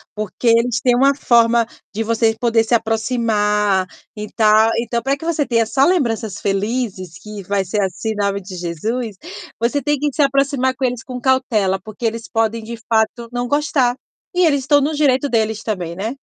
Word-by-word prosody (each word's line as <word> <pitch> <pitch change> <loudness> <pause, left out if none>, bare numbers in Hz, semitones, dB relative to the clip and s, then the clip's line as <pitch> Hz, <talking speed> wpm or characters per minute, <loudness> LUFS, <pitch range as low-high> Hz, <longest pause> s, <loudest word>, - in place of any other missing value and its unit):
porque 215 +3 -4
eles 235 +1 +3
têm 245 -1 +3
uma 275 +3 +4
forma 235 -3 +3 0.3
de 220 +2 -2
você 225 0 +1
poder 230 -2 +2
se 230 - -2
aproximar 215 -4 +1 0.3
e 210 0 -6
tal. 220 0 +5
Então 235 0 -2
pra 275 +1 0
que 320 - -9
você 315 -4 0
tenha 230 -2 +2
só 270 +5 +2
lembranças 235 - 0
felizes, 195 -3 -2
que 210 -2 -8
vai 200 +1 0
ser 205 +3 -1
assim, 195 +3 -3
em - - -4
nome 200 -1 -1
de 185 0 -9
Jesus, 205 +7 -3 0.4
você 240 +5 0
tem 295 +2 0
que 295 +1 0
se - - 0
aproximar 275 -2 +1
com 260 - -1
eles 245 -2 -2
com 250 -1 -7
cautela, 225 -8 +1
porque 215 +2 -7
eles 230 0 -2
podem, 225 0 0
de 235 +1 -7
fato, 225 +1 +1
não 245 0 -2
gostar. 275 -3 +1 0.4
E 360 -1 +4
eles 285 -3 +1
tão 290 -1 +5
no 295 +3 0
direito 285 -2 +2
deles 220 -1 0
também, 180 -6 -3
né. 220 +6 -3
230 Hz, 190 wpm, -19 LUFS, 210-255 Hz, 0.4 s, tal